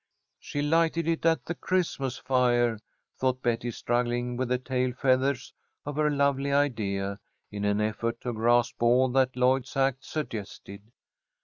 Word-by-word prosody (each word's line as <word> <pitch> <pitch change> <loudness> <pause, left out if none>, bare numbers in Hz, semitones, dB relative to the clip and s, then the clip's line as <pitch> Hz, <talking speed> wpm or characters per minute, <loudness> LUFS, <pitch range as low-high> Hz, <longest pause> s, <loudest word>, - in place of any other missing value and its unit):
"She 145 - -4
lighted 165 +1 +2
it 165 0 +1
at 165 0 +2
the 175 - -3
Christmas 160 -9 -1
fire," 120 -3 +2 0.4
thought 130 -1 0
Betty, 120 0 0
struggling 120 +1 -1
with 130 0 -2
the 125 - +2
tail 125 0 -1
feathers 130 +1 +1 0.3
of 145 0 -4
her 150 0 +3
lovely 140 -1 +1
idea, 100 -8 0 0.3
in 105 0 -3
an 105 0 +1
effort 110 +2 -1
to 125 - -3
grasp 120 +2 +2
all 125 +2 +4
that 130 0 +2
Lloyd's 130 +2 +1
act 135 0 +1
suggested. 105 -8 -6
125 Hz, 145 wpm, -27 LUFS, 120-140 Hz, 0.4 s, all